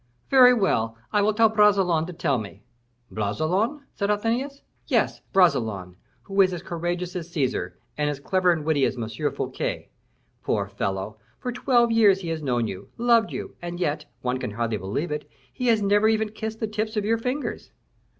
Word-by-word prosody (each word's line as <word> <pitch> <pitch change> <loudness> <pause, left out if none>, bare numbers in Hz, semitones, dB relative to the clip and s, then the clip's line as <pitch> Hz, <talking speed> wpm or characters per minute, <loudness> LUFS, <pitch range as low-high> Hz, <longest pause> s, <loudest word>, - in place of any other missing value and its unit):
"Very 255 -2 +8
well! 115 - +1 0.2
I 210 - +4
will 215 +2 +1
ask 225 -1 +5
Bragelonne 195 -6 +4
to 180 - -7
tell 140 -6 0
me." 100 -1 -9 0.5
"Bragelonne?" 170 - -1
said 200 -1 -2
Athenais. 235 +7 -1 0.2
"Yes! - - +1
Bragelonne, 110 - +2 0.3
who 195 0 +2
is 185 -1 +3
as 175 -1 -5
courageous 175 0 -3
as 170 -2 -5
Caesar, 130 - -2 0.2
and 150 0 +1
as 145 -2 -3
clever 185 +4 +2
and 160 -3 -1
witty 155 -3 +2
as 130 - -2
M. 115 -2 -3 0.2
Fouquet. - - -4 0.5
Poor - - 0
fellow! 95 +2 -3 0.2
for 250 - -4
twelve 240 -1 +2
years 205 -4 +5
he 170 - -5
has 160 -1 -3
known 120 -5 0
you, 95 -1 -7
loved 235 -2 +3
you, - - -6
and 175 0 -5
yet 150 -3 -1 0.2
one 125 0 -1
can - - -3
hardly 115 +1 -2
believe 105 - -3
it 150 0 -4 0.2
he 250 - -2
has 225 -3 +3
never 205 +2 +4
even 220 -1 +2
kissed 220 0 -5
the 220 - 0
tips 215 +1 -3
of 205 - 0
your 225 +1 +1
fingers." 255 +5 -3
180 Hz, 185 wpm, -25 LUFS, 140-220 Hz, 0.5 s, Very